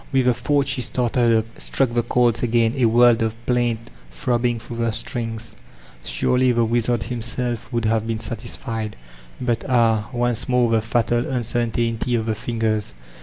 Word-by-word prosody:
With 135 Hz, -2 st, +2 dB
the 125 Hz, -, +4 dB
thought 140 Hz, +4 st, +1 dB
she 125 Hz, -, 0 dB
started 120 Hz, 0 st, +1 dB
up, 110 Hz, 0 st, 0 dB
stmdr 130 Hz, -3 st, 0 dB
the 120 Hz, -, +2 dB
diords 120 Hz, -1 st, +2 dB
again, 115 Hz, -1 st, +2 dB
a 130 Hz, -3 st, +2 dB
world 120 Hz, 0 st, +5 dB
of 110 Hz, -1 st, 0 dB
pbunt 120 Hz, -2 st, +1 dB, 0.3 s
throbbiog 120 Hz, -, 0 dB
through 115 Hz, +1 st, -8 dB
the 115 Hz, 0 st, +1 dB
strings; 115 Hz, -2 st, -4 dB, 0.5 s
sorely 125 Hz, -, +2 dB
the 120 Hz, -1 st, +2 dB
wizard 120 Hz, 0 st, +1 dB
htmsdf 120 Hz, 0 st, -3 dB
wouM 115 Hz, -2 st, -1 dB
have 110 Hz, 0 st, +1 dB
been 115 Hz, -1 st, -1 dB
satisfied. 115 Hz, -1 st, -4 dB, 0.4 s
But 120 Hz, -2 st, -1 dB
ah» 115 Hz, -4 st, +2 dB
once 120 Hz, 0 st, -1 dB
more 125 Hz, -2 st, +3 dB
the 115 Hz, -1 st, +3 dB
fatal 120 Hz, +2 st, 0 dB
uncertainty 120 Hz, -1 st, -1 dB
of 110 Hz, -2 st, -1 dB
the 110 Hz, -, 0 dB
fingers. 110 Hz, -, -2 dB
115 Hz, 165 wpm, -22 LUFS, 115-120 Hz, 0.5 s, world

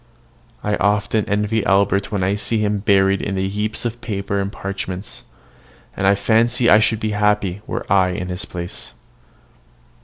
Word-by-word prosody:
I 105 Hz, 0 st, 0 dB
often 105 Hz, +1 st, +1 dB
envy 105 Hz, +1 st, 0 dB
Albert 100 Hz, 0 st, +2 dB
when 100 Hz, -3 st, -1 dB
I 95 Hz, +2 st, +1 dB
see 110 Hz, +2 st, -1 dB
him 105 Hz, -1 st, 0 dB
buried 100 Hz, -1 st, +3 dB
in 95 Hz, -2 st, -3 dB
a 95 Hz, 0 st, 0 dB
heap 105 Hz, +2 st, -2 dB
of 120 Hz, 0 st, -3 dB
papers 100 Hz, -2 st, -2 dB
and 100 Hz, 0 st, -3 dB
parchments, 95 Hz, -1 st, -5 dB, 0.7 s
and 95 Hz, -, 0 dB
I 100 Hz, -, +5 dB
fancy 115 Hz, +4 st, +2 dB
I 105 Hz, -, +8 dB
should 110 Hz, 0 st, +1 dB
be 110 Hz, -1 st, -2 dB
happy 105 Hz, -2 st, +1 dB
were -, -, -4 dB
I 95 Hz, -1 st, +3 dB
in 90 Hz, 0 st, -4 dB
his 90 Hz, +1 st, -3 dB
place. 85 Hz, -1 st, -7 dB
100 Hz, 165 wpm, -20 LUFS, 95-105 Hz, 0.7 s, I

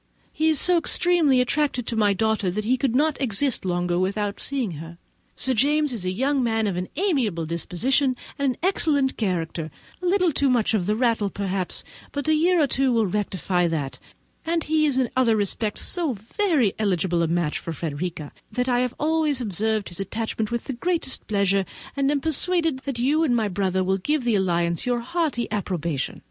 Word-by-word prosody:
He 315 Hz, +1 st, +2 dB
is 310 Hz, -3 st, +3 dB
so 355 Hz, -1 st, +4 dB
extremely 325 Hz, -6 st, +3 dB
attached 255 Hz, -1 st, 0 dB
to 230 Hz, -, -2 dB
my 210 Hz, -2 st, +3 dB
daughter 220 Hz, -1 st, 0 dB
that 210 Hz, +4 st, -2 dB
he 250 Hz, +3 st, +3 dB
could 255 Hz, -2 st, -1 dB
not 300 Hz, +2 st, +1 dB
exist 260 Hz, +1 st, +1 dB
longer 175 Hz, -1 st, 0 dB
without 200 Hz, +2 st, -1 dB
seeing 265 Hz, -8 st, -2 dB
her. 165 Hz, +1 st, -10 dB, 0.4 s
Sir 265 Hz, -, +1 dB
James 290 Hz, +3 st, +2 dB
is 190 Hz, -6 st, -2 dB
a -, -, +1 dB
young 270 Hz, +7 st, +1 dB
man 225 Hz, -2 st, +1 dB
of 195 Hz, -3 st, -1 dB
an 180 Hz, +1 st, -3 dB
amiable 265 Hz, -, 0 dB
disposition 245 Hz, -, 0 dB, 0.2 s
and 270 Hz, -3 st, 0 dB
excellent 295 Hz, -8 st, +2 dB
character; 165 Hz, -6 st, -2 dB, 0.3 s
a -, -, -5 dB
little 365 Hz, -2 st, +3 dB
too 280 Hz, -1 st, +2 dB
much 240 Hz, -3 st, +2 dB
of 195 Hz, -5 st, 0 dB
the 210 Hz, -, +2 dB
rattle, 225 Hz, -3 st, +1 dB
perhaps, 195 Hz, -2 st, -2 dB, 0.3 s
but 285 Hz, +1 st, -3 dB
a 315 Hz, -, +4 dB
year 345 Hz, +3 st, +3 dB
or 300 Hz, -, +5 dB
two 270 Hz, 0 st, +1 dB
will 230 Hz, -2 st, +2 dB
rectify 185 Hz, -2 st, 0 dB
that: 150 Hz, -5 st, -3 dB, 0.4 s
and 330 Hz, 0 st, 0 dB
he 310 Hz, 0 st, +2 dB
is 275 Hz, -3 st, 0 dB
in 255 Hz, -3 st, +1 dB
other 245 Hz, -4 st, +3 dB
respects 210 Hz, +1 st, -1 dB
so 335 Hz, -7 st, -1 dB
very 240 Hz, -, 0 dB
eligible 180 Hz, -4 st, +1 dB
a 165 Hz, -, +2 dB
match 170 Hz, -2 st, 0 dB
for 165 Hz, -, -6 dB
Frederica, 155 Hz, 0 st, -4 dB, 0.2 s
that 250 Hz, 0 st, -1 dB
I 245 Hz, -1 st, +2 dB
have 250 Hz, -1 st, -1 dB
always 310 Hz, -2 st, +1 dB
observed 215 Hz, -1 st, -1 dB
his 175 Hz, -, -7 dB
attachment 220 Hz, +2 st, -3 dB
with 235 Hz, -1 st, -2 dB
the 270 Hz, -, -4 dB
greatest 330 Hz, +2 st, -1 dB
pleasure; 200 Hz, -2 st, +2 dB, 0.3 s
and 275 Hz, -1 st, +1 dB
am 290 Hz, -1 st, +1 dB
persuaded 325 Hz, -1 st, +1 dB
that 275 Hz, -3 st, -3 dB
you 280 Hz, +6 st, +2 dB
and 280 Hz, -7 st, +2 dB
my 220 Hz, -3 st, +1 dB
brother 190 Hz, -1 st, 0 dB
will 190 Hz, +1 st, 0 dB
give 295 Hz, +7 st, 0 dB
the 240 Hz, -1 st, +1 dB
alliance 170 Hz, -3 st, +1 dB
your 245 Hz, -1 st, 0 dB
hearty 300 Hz, -2 st, -1 dB
approbation. 170 Hz, -8 st, -2 dB
235 Hz, 195 wpm, -24 LUFS, 190-285 Hz, 0.4 s, or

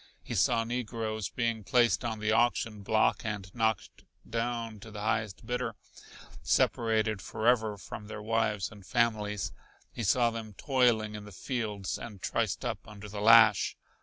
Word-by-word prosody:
He -, -, -6 dB
saw 115 Hz, -, +3 dB
negroes 115 Hz, -3 st, -3 dB
being 115 Hz, -2 st, -1 dB
placed 120 Hz, -5 st, +3 dB
on 115 Hz, -2 st, -2 dB
the 105 Hz, 0 st, 0 dB
auction 110 Hz, -2 st, +1 dB
block 110 Hz, +2 st, +2 dB
and 100 Hz, -4 st, -5 dB
knocked 110 Hz, -4 st, -1 dB, 0.2 s
down 115 Hz, -2 st, -3 dB
to 110 Hz, -, -11 dB
the 105 Hz, -1 st, -7 dB
highest 110 Hz, -1 st, -1 dB
bidder, 125 Hz, +2 st, -2 dB, 0.7 s
separated 110 Hz, -3 st, +1 dB
forever 110 Hz, -1 st, +1 dB
from 105 Hz, +1 st, -8 dB
their 110 Hz, -, -6 dB
wives 110 Hz, -2 st, 0 dB
and 105 Hz, -2 st, -13 dB
families. 105 Hz, -, 0 dB, 0.4 s
He -, -, -6 dB
saw 120 Hz, +3 st, +3 dB
them 110 Hz, -2 st, -7 dB
toiling 120 Hz, -5 st, +2 dB
in 105 Hz, -1 st, -7 dB
the 105 Hz, -, -11 dB
fields 105 Hz, -2 st, -3 dB
and 105 Hz, -5 st, -8 dB
triced -, -, -1 dB
up -, -, -2 dB
under 105 Hz, 0 st, -10 dB
the 105 Hz, 0 st, -6 dB
lash. 110 Hz, -1 st, +6 dB
110 Hz, 155 wpm, -30 LUFS, 105-115 Hz, 0.7 s, lash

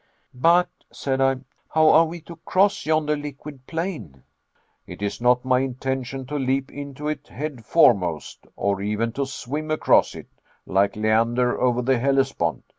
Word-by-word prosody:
"But," 170 Hz, +7 st, +4 dB, 0.2 s
said 135 Hz, -1 st, -2 dB
I, 135 Hz, 0 st, +3 dB, 0.3 s
"how 155 Hz, 0 st, +4 dB
are 165 Hz, +1 st, +6 dB
we 165 Hz, +1 st, -7 dB
to 170 Hz, +2 st, -11 dB
cross 190 Hz, +1 st, +1 dB
yonder 155 Hz, -1 st, +2 dB
liquid 145 Hz, -2 st, -9 dB
plain?" 160 Hz, -, -5 dB, 0.6 s
"It -, -, -9 dB
is 100 Hz, +3 st, -3 dB
not 125 Hz, +1 st, +3 dB
my 130 Hz, -1 st, +3 dB
intention 130 Hz, 0 st, -3 dB
to 145 Hz, +3 st, -4 dB
leap 135 Hz, +1 st, -1 dB
into 145 Hz, +1 st, -7 dB
it 150 Hz, -, -4 dB
head 145 Hz, -6 st, -6 dB
foremost, 95 Hz, -, +2 dB
or 100 Hz, -1 st, -1 dB
even 105 Hz, +3 st, -1 dB
to 135 Hz, +3 st, -3 dB
swim 145 Hz, +3 st, -5 dB
across 155 Hz, -, +3 dB
it, -, -, -10 dB, 0.4 s
like 100 Hz, +1 st, +1 dB
Leander 115 Hz, +3 st, +1 dB
over 125 Hz, -1 st, +2 dB
the 130 Hz, 0 st, +2 dB
Hellespont. 135 Hz, -10 st, 0 dB
135 Hz, 155 wpm, -23 LUFS, 120-150 Hz, 0.6 s, are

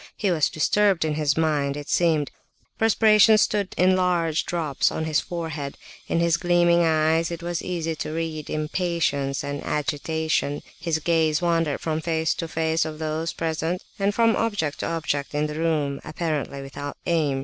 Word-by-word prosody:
He 200 Hz, -3 st, +1 dB
was 155 Hz, -4 st, +2 dB
disturbed 190 Hz, +2 st, +2 dB
in 155 Hz, -, 0 dB
his 150 Hz, -1 st, 0 dB
mind, 145 Hz, -3 st, +1 dB
it 145 Hz, -, -7 dB
seemed; 160 Hz, -4 st, +1 dB, 0.5 s
perspiration 220 Hz, -1 st, +5 dB
stood 205 Hz, -2 st, +1 dB
in 185 Hz, +1 st, +4 dB
large 175 Hz, -4 st, +1 dB
drops 160 Hz, -6 st, 0 dB
on 160 Hz, -, -3 dB
his 155 Hz, -2 st, +2 dB
forehead; 160 Hz, -5 st, -5 dB, 0.3 s
in -, -, 0 dB
his 170 Hz, 0 st, +3 dB
gleaming 175 Hz, -1 st, +3 dB
eyes 160 Hz, 0 st, +2 dB
it 170 Hz, -1 st, -6 dB
was 175 Hz, -1 st, -2 dB
easy 165 Hz, -3 st, -2 dB
to -, -, -4 dB
read 160 Hz, -2 st, -4 dB
impatience 155 Hz, -4 st, -1 dB
and 145 Hz, 0 st, -4 dB
agitation; 150 Hz, 0 st, -1 dB, 0.2 s
his 165 Hz, -1 st, 0 dB
gaze 160 Hz, -1 st, +1 dB
wandered 165 Hz, -4 st, 0 dB
from 160 Hz, -1 st, -2 dB
face 160 Hz, -1 st, 0 dB
to 165 Hz, -, -4 dB
face 160 Hz, 0 st, 0 dB
of 155 Hz, -1 st, -5 dB
those 160 Hz, +1 st, -2 dB
present, 165 Hz, +2 st, -2 dB, 0.2 s
and 200 Hz, +1 st, +1 dB
from 230 Hz, -1 st, +4 dB
object 205 Hz, -10 st, -1 dB
to -, -, -2 dB
object 150 Hz, -4 st, -2 dB
in 150 Hz, +1 st, +1 dB
the 150 Hz, -, -4 dB
room, 150 Hz, -4 st, 0 dB
apparently 155 Hz, -3 st, -3 dB
without 140 Hz, +1 st, -7 dB
aim. 155 Hz, -6 st, +1 dB
160 Hz, 170 wpm, -24 LUFS, 150-170 Hz, 0.5 s, perspiration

